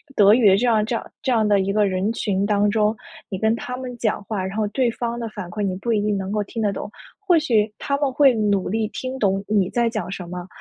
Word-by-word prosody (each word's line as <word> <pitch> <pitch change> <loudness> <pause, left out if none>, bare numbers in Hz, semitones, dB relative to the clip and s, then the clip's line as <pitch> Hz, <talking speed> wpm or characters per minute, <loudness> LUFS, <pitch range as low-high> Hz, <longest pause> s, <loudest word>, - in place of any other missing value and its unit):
德 205 0 +6
语 225 -3 +5
的 190 - +5
这 245 - +1
样 220 -3 +3
这 230 +1 -2
样 - - -6
这 260 - -1
样 220 -3 +3
的 205 -1 +4
一 195 +1 0
个 210 -1 +3
人 190 +3 0
群 200 -3 -1
当 205 0 +2
中。 215 0 +2 0.3
你 190 - -3
跟 220 +3 +2
他 250 +1 -5
们 255 -1 -6
讲 220 -3 -1
话， 200 -4 -3
然 190 - -5
后 215 - +1
对 250 +2 +1
方 235 0 -4
的 230 - -3
反 205 -4 -7
馈 210 +4 -5
你 195 -2 -1
不 235 +5 -2
一 210 -2 +2
定 205 -1 0
能 190 +1 -4
够 210 - 0
听 225 - -5
得 210 -2 +1
懂。 200 - -6 0.4
或 350 -2 +5
许 225 -8 +2
他 280 - -1
们 280 -2 0
会 275 -1 +5
努 205 -3 +1
力 220 +2 0
听 255 +4 -5
懂 195 -3 +1
你 200 -3 +2
在 235 +1 +1
讲 215 -5 -4
什 185 -2 -6
么， 180 0 -6
215 Hz, 295 characters per minute, -22 LUFS, 200-235 Hz, 0.4 s, 德